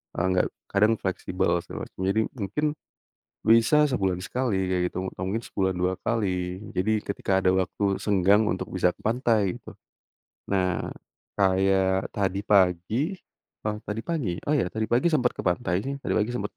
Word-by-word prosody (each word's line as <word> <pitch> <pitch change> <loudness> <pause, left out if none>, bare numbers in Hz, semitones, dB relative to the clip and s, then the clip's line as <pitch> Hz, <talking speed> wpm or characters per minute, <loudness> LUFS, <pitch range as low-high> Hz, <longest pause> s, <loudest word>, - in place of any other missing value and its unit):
eee, 85 - 0
nggak 90 - +2 0.2
kadang 105 +3 +4
fleksibel, 95 -3 -1
segala - - -7
macam. - - -24
Jadi 105 +3 +2 0.2
mungkin, 105 +9 -2 0.8
bisa 115 +7 +5
sebulan 95 -8 0
sekali 95 -3 -1
kayak 90 -1 +1
gitu, 95 +1 -3
atau 95 - -7
mungkin 105 +5 -1
sebulan 95 -4 -1
2 90 +1 -1
kali. 95 -4 -1 0.2
Jadi 110 +3 +1
ketika 95 -1 -1
ada 95 - +3
waktu 95 +1 +1
senggang 100 +1 +3
untuk 95 -3 -2
bisa 90 -1 +1
ke - - -23
pantai, 110 -4 +1
gitu. - - -12 0.8
Nah, 90 -3 0 0.5
kayak 95 -1 +2
tadi 100 -1 -1
pagi 100 - +2 0.6
oh 105 - -2
tadi 105 0 -3
pagi? 115 - -2
Oh 150 - +3
ya, 130 - +2
tadi 110 0 -2
pagi 135 +8 +2
sempat 125 -5 +2
ke - - -5
pantai 90 +1 0
sih. 135 - -2
Tadi - - -2
pagi 110 +2 +1
sempat 105 -4 -4
100 Hz, 165 wpm, -26 LUFS, 95-110 Hz, 0.8 s, bisa